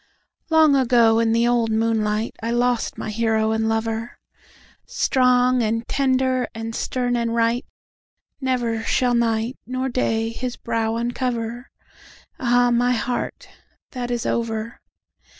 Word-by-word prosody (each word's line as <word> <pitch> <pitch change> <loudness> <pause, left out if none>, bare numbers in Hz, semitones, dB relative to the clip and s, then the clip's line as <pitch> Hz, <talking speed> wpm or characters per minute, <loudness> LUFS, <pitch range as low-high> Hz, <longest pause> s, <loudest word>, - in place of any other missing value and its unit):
Long 315 -3 +5
ago, 235 -4 +4
in 230 -1 +2
the 230 +1 +2
old 240 -2 +2
moonlight,I 220 0 -1
lost 240 0 0
my 215 - -4
hero 220 0 +1
and 220 0 0
lover; 225 +1 -2 0.7
Strong 250 -1 +2
and 230 +1 -1
tender 260 -2 +1
and 225 0 -5
stern 245 +1 -1
and 235 -1 -1
right, 230 +2 +1 0.8
Never 240 -4 -1
shall 245 +2 +1
nightNor 240 +3 -1
day 225 -3 0
his 245 +2 -5
brow 225 -1 -1
uncover. 240 0 -3 0.7
Ah, 245 0 +3
my 245 +1 +2
heart, 245 +1 -3 0.4
that 245 -3 -4
is 240 -1 -2
over! 230 0 -2
235 Hz, 120 wpm, -22 LUFS, 225-250 Hz, 0.8 s, Long